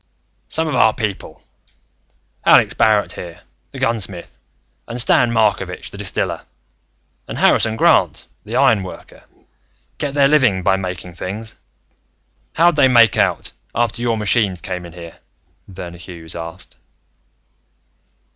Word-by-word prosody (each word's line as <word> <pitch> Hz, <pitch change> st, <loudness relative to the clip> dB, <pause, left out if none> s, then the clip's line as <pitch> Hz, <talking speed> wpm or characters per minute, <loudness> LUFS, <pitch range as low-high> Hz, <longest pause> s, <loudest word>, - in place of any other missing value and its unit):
"Some 160 Hz, 0 st, -2 dB
of 155 Hz, -, -2 dB
our 110 Hz, -, +4 dB
people, 105 Hz, -4 st, -5 dB, 1.0 s
Alex -, -, +5 dB
Barrett 105 Hz, -2 st, +2 dB
here, 85 Hz, -2 st, -9 dB, 0.3 s
the -, -, -11 dB
gunsmith, 100 Hz, -6 st, -3 dB, 0.5 s
and 120 Hz, +1 st, -5 dB
Stan 120 Hz, -1 st, +3 dB
Markovitch, 100 Hz, -5 st, 0 dB
the -, -, -10 dB
distiller, -, -, -3 dB, 0.9 s
and -, -, -6 dB
Harrison 110 Hz, 0 st, +3 dB
Grant, -, -, +2 dB, 0.2 s
the -, -, -6 dB
iron 110 Hz, -3 st, +4 dB
worker 95 Hz, -, -11 dB, 0.7 s
get 145 Hz, -1 st, -3 dB
their 140 Hz, -1 st, +5 dB
living 125 Hz, -11 st, +3 dB
by 95 Hz, +1 st, +3 dB
making 90 Hz, -2 st, -6 dB
things. 105 Hz, +6 st, -7 dB, 1.0 s
How'd 170 Hz, 0 st, +3 dB
they 135 Hz, -, +6 dB
make 115 Hz, -6 st, +5 dB
out, -, -, 0 dB, 0.2 s
after 120 Hz, 0 st, -1 dB
your 115 Hz, -2 st, 0 dB
machines 105 Hz, -3 st, +1 dB
came 90 Hz, -1 st, -6 dB
in 85 Hz, -, -14 dB
here?" 85 Hz, -2 st, -11 dB, 0.5 s
Verner 90 Hz, -2 st, -9 dB
Hughes 85 Hz, -2 st, -9 dB
asked. 85 Hz, -1 st, -9 dB
105 Hz, 125 wpm, -19 LUFS, 90-120 Hz, 1.0 s, they